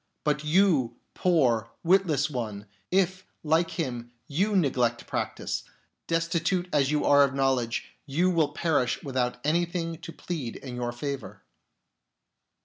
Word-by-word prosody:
But 150 0 0
you, 155 -6 +3 0.2
poor, 125 -11 +2
witless 170 -5 +3
one, 110 -8 -4 0.2
if, 185 0 +1 0.2
like 165 +2 +2
him, 120 -8 -4 0.2
you 195 +8 +1
neglect 125 -9 +1
practice, - - -3 0.4
destitute 165 +2 0
as 140 -2 +3
you 150 0 +1
are 145 0 +7
of 135 -1 0
knowledge, 130 -4 +1 0.2
you 170 +7 +2
will 160 -4 +2
perish 145 -5 0
without 130 -3 -1
anything 165 +1 0
to - - -8
plead 155 -10 -5
in 130 -3 -7
your 120 -1 -2
favour." 140 +2 -5
150 Hz, 130 wpm, -27 LUFS, 125-170 Hz, 0.4 s, are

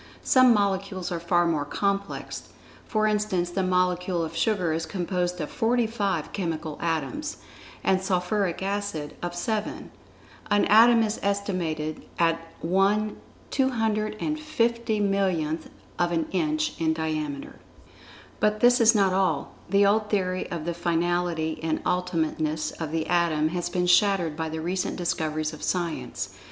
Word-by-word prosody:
Some 255 -1 +6
molecules 195 -3 0
are 170 - -2
far 175 +1 +2
more 160 -4 +1
complex, 200 +6 -3 0.4
for 215 -1 +1
instance 210 -5 0
the 190 - -1
molecule 180 -1 +1
of 160 +1 -8
sugar 180 -2 +1
is 165 +1 -2
composed 180 -1 -2
of 150 - -4
forty 235 +1 +2
five 200 -8 -2
chemical 160 -5 -3
atoms, 165 - -2 0.5
and 190 -1 +2
sulphuric 190 0 0
acid 195 -7 -3
of 175 0 -4
seven. 215 +4 -3 0.6
An 205 -1 +3
atom 230 +2 +6
is 215 0 -2
estimated 180 -6 -2
at 165 -1 +2 0.2
one 195 +5 +2 0.3
250,000,000th 215 - 0 0.3
of 175 0 +2
an 165 -2 +1
inch 310 - -1
in 160 -1 +2
diameter. 155 -3 -3 0.8
But 210 0 +2
this 245 +1 +5
is 225 0 +6
not 195 -3 +3
all. 185 -5 +1 0.2
The 200 +1 +4
old 210 +1 +2
theory 185 -3 -1
of 170 -4 -4
the 170 - -1
finality, 170 -1 0
and 160 -1 0
ultimateness 160 -3 -1
of 160 -2 -3
the 160 -1 -1
Atom 165 -3 +2
has 175 +1 -2
been 180 0 0
shattered 180 -3 +3
by 160 0 -3
the 160 0 -4
recent 180 +3 -2
discoveries 155 -3 -1
of 155 - -10
Science. 175 -3 -2
180 Hz, 140 wpm, -26 LUFS, 165-205 Hz, 0.8 s, Some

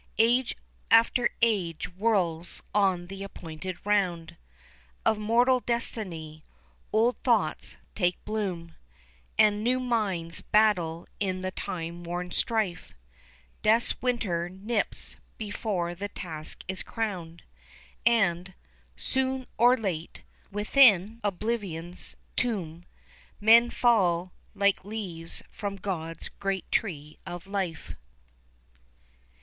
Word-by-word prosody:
Age 240 +3 +3 0.3
after 230 +2 +5
age 185 -8 +1
whirls 180 -5 +1
on 190 -4 +2
the 195 +2 -8
appointed 180 -2 -6
round 175 -5 +1 0.7
Of 220 -1 +3
mortal 240 +4 +4
destiny; 180 -11 -3 0.5
old 225 +2 +3
thoughts 215 -11 +1 0.2
take 180 -3 +1
bloom; 185 -6 -3 0.6
And 210 0 +4
new 250 +2 +2
minds 200 -9 -1
battle 180 -7 +2
in 185 -2 -1
the 185 0 -2
time 170 -1 -5
worn 175 +1 -4
strife, 220 -7 -1 0.7
Death's 225 +2 +3
winter 195 -9 0
nips 205 +4 -2 0.2
before 205 -5 -2
the 200 +4 -5
task 160 -6 -4
is 190 0 -2
crowned, 180 -7 -4 0.6
And, 190 -6 +2 0.4
soon 265 -1 -1
or 245 +2 +6
late, 175 -7 -4 0.3
within 210 -1 +5
oblivion's 190 -4 -2 0.2
tomb 175 -8 -2 0.5
Men 230 +3 +7
fall 185 -8 +2 0.2
like 200 -1 +2
leaves 185 -6 -5
from 200 -1 -4
God's 170 -4 -4
great 195 -1 -2
tree 150 -8 -2
of 175 0 -6
life. 190 -5 -3
195 Hz, 100 wpm, -28 LUFS, 175-225 Hz, 0.7 s, Men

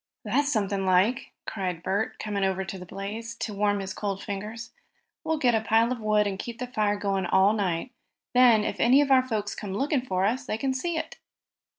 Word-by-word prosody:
"That's 275 +6 +1
something 200 -4 0
like!" 190 +6 +2
cried 180 -4 -4
Bert, 205 +6 -1
coming 205 -2 -2
over 190 0 0
to 190 0 -6
the 180 - -10
blaze 215 +5 -6
to 225 -2 -4
warm 205 0 +1
his 190 0 -5
cold 200 -2 -3
fingers. 210 +3 -6 0.5
"We'll 320 -1 0
get 250 -5 +3
a 220 - +2
pile 225 +2 +3
of 255 - -2
wood 215 -1 +2
and 195 -1 -3
keep 235 +2 -6
the 250 - -3
fire 215 -4 0
going 195 -2 -1
all 195 +3 +4
night. 195 +1 -1 0.4
Then, 245 -4 +6
if - - -3
any 255 +4 +5
of 280 -1 0
our 260 -1 +7
folks 210 -4 -2
come 195 -2 -5
looking 275 +3 +1
for 190 -6 -1
us, 250 +5 -1
they 215 - -1
can 265 +3 -1
see 330 +6 -2
it." - - -5
210 Hz, 215 wpm, -27 LUFS, 195-245 Hz, 0.5 s, our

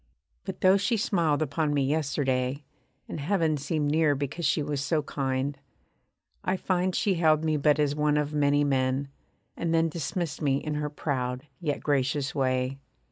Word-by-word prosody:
But - - -6
though 190 +1 +6
she 225 +4 +1
smiled 165 -7 +1
upon 150 0 -1
me 140 - +2
yesterday, 135 -2 0 0.4
And - - -5
heaven 160 0 +1
seemed 145 +1 -1
near 155 -2 +3
because 145 +5 -2
she 150 - +1
was 145 -1 -2
so 155 +1 0
kind, 135 0 -2 0.8
I 185 +1 0
find 185 0 0
She 200 - +2
held 160 -2 +3
me 155 -1 +2
but 150 0 +3
as 145 -1 +1
one 150 0 +2
of 150 0 -1
many 145 0 +3
men; 135 0 0 0.5
and 165 -1 -1
then 165 0 +3
Dismissed 170 +1 -3
me 140 -3 +2
in 150 +1 -3
her 150 0 -2
proud, 130 -3 -3
yet 150 -5 -2
gracious 140 -1 0
way. 130 0 0
150 Hz, 170 wpm, -27 LUFS, 140-160 Hz, 0.8 s, though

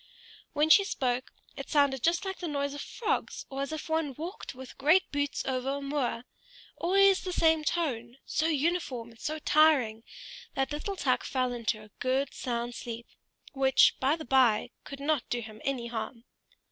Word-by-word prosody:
When 305 +2 +3
she 400 - +8
spoke 255 -9 -1 0.2
it - - -7
sounded 280 -4 +3
just 340 +7 +2
like 385 0 -4
the 350 - -3
noise 280 -2 -2
of 285 - -6
frogs, 465 - -2
or 270 0 -3
as 275 - -3
if 315 -1 -5
one 320 -4 -1
walked 330 - -7
with 260 0 -11
great 315 +7 +5
boots 285 0 -1
over 260 +1 -1
a - - -4
moor; 275 -4 -2 0.5
always 390 +2 +4
the 370 - -3
same 320 -3 +3
tone, 255 -8 -2
so 315 +2 0
uniform 295 -6 -1
and 230 - -19
so 310 +1 -3
tiring 295 -8 +3 0.5
that 270 0 0
little 305 +7 -3
Tuk 265 -8 +1
fell 255 -2 -1
into 220 -2 -2
a 210 - -17
good 260 +2 0
sound 240 -1 -3
sleep, 235 -1 -6 0.5
which, 265 -1 +5
by 270 +4 +3
the 315 - -8
bye, 250 -4 +3
could 275 - -8
not 285 -3 0
do 240 - 0
him 215 -2 -9
any 265 -4 -1
harm. 230 0 -5
275 Hz, 180 wpm, -29 LUFS, 245-315 Hz, 0.5 s, she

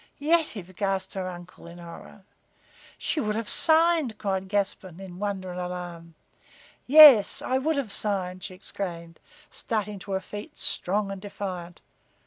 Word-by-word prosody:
"Yetive!" 285 - 0
gasped 195 -1 -1
her 190 -1 -4
uncle, 175 -1 -11
in 170 +1 -11
horror. 170 +3 -12 0.7
"She 315 - -2
would 210 -6 -1
have 225 -1 -3
signed," 320 -7 +3
cried 190 -2 -2
Gaspon, 195 -3 -2
in 185 -2 -10
wonder 195 -3 -3
and 180 - -6
alarm. 175 -2 -7 0.7
"Yes, 280 -6 +9
I 260 +1 0
would 310 +3 0
have 255 -7 -3
signed!" 185 -4 -2
she 185 - -7
exclaimed, 170 -3 -6 0.3
starting 210 -3 -3
to 195 +1 -7
her 190 - +1
feet, 205 +2 -9
strong 200 +2 -1
and 195 -1 -7
defiant. 185 -4 -7
195 Hz, 145 wpm, -26 LUFS, 180-215 Hz, 0.7 s, Yes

